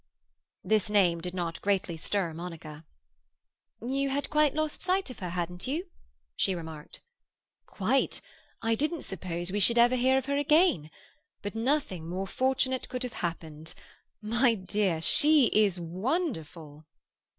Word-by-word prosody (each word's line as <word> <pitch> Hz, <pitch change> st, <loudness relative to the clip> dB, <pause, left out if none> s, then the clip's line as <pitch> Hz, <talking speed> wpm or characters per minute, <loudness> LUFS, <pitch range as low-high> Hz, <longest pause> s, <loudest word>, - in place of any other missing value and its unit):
This 215 Hz, +2 st, +1 dB
name 180 Hz, -5 st, +3 dB
did 180 Hz, +1 st, -5 dB
not 170 Hz, -2 st, -3 dB
greatly 190 Hz, -4 st, 0 dB
stir 170 Hz, +1 st, -1 dB
Monica. 160 Hz, -2 st, -8 dB, 1.0 s
"You 275 Hz, +1 st, 0 dB
had 280 Hz, +1 st, -2 dB
quite 300 Hz, -1 st, +3 dB
lost 310 Hz, -1 st, -1 dB
sight 370 Hz, -5 st, 0 dB
of -, -, -11 dB
her, 180 Hz, -3 st, -4 dB
hadn't 180 Hz, +2 st, -4 dB
you?" 340 Hz, +7 st, -3 dB, 0.4 s
she 190 Hz, -, +1 dB
remarked. 160 Hz, -3 st, -9 dB, 0.7 s
"Quite. 230 Hz, +8 st, 0 dB, 0.4 s
I 225 Hz, 0 st, +2 dB
didn't 305 Hz, +7 st, -1 dB
suppose 175 Hz, -1 st, -4 dB
we 205 Hz, -, 0 dB
should 235 Hz, +4 st, +3 dB
ever 240 Hz, +2 st, +6 dB
hear 260 Hz, +1 st, +3 dB
of 265 Hz, -, -1 dB
her 280 Hz, +1 st, 0 dB
again. 290 Hz, -, +3 dB, 0.5 s
But 205 Hz, -, -4 dB
nothing 225 Hz, -, -1 dB
more 185 Hz, +2 st, -2 dB
fortunate 260 Hz, +4 st, 0 dB
could 250 Hz, 0 st, -3 dB
have 250 Hz, -1 st, -5 dB
happened. 160 Hz, -2 st, -5 dB, 0.5 s
My 235 Hz, +2 st, +3 dB
dear, 185 Hz, -4 st, -1 dB
she 295 Hz, -, +5 dB
is 205 Hz, -4 st, +3 dB
wonderful!" 165 Hz, -, -3 dB
205 Hz, 140 wpm, -29 LUFS, 170-265 Hz, 1.0 s, ever